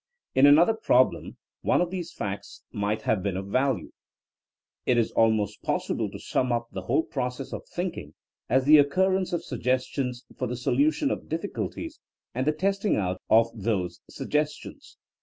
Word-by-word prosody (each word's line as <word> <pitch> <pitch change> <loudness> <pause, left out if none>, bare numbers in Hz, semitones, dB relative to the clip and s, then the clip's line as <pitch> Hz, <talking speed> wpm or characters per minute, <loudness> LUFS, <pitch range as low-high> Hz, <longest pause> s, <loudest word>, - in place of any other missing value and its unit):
In 135 +2 +6
another 165 +9 +6
problem 130 - +2 0.2
one - - +2
of 175 0 0
these 180 -3 -4
facts 100 0 -6
might 105 +1 -2
have 110 -4 +1
been 95 -1 -2
of 95 - -4
value. 130 -3 0 1.0
It 125 - +3
is 115 - +2
almost 110 -2 +1
possible - - -1
to - - -8
sum 125 -1 -1
up 120 0 -1
the 95 - -5
whole 130 +11 +1
process 130 -1 -4
of - - -7
thinking 175 - -5 0.3
as 130 0 +3
the 150 +1 +8
occurrence 185 +6 +2
of 175 - -1
sugges 130 0 0
tions 125 -3 -3
for 130 - -2
the 125 +1 -4
solution 285 - +1
of - - -4
diflSculties 205 - -4 0.3
and 130 +3 -2
the - - +5
test 195 +5 -1
ing 210 - +2
out 90 -2 -2
of 115 +1 +5
those 95 -5 -2
suggestions. 150 0 -3
130 Hz, 170 wpm, -26 LUFS, 110-165 Hz, 1.0 s, the